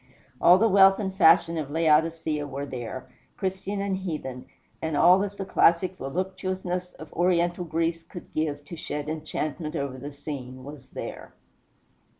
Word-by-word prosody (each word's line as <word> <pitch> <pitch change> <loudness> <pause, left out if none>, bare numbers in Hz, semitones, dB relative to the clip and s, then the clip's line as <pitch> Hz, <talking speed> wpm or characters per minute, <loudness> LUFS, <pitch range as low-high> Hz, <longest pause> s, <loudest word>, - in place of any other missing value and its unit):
All 175 +1 +8
the 225 +4 +4
wealth 195 -1 +6
and 190 -2 -3
fashion 165 -2 +5
of 145 -3 -4
Laodicea 160 -1 +1
were 140 0 -5
there, 130 -1 -6 0.3
Christian 190 +1 -3
and 200 -1 -1
heathen; 150 -9 -5 0.3
and 160 -2 -1
all 180 +4 +7
that 200 0 -3
the 195 - -4
classic 180 0 +3
voluptuousness 185 +3 -3
of 155 - -12
Oriental 175 0 +1
Greece 165 +1 -1
could 175 +1 -12
give 145 -2 -2
to 170 - -8
shed 150 -2 -5
enchantment 155 0 -4
over 140 -2 -3
the 145 +3 -7
scene 130 -3 -7
was 140 -1 -10
there. - - -8
165 Hz, 155 wpm, -26 LUFS, 145-185 Hz, 0.3 s, All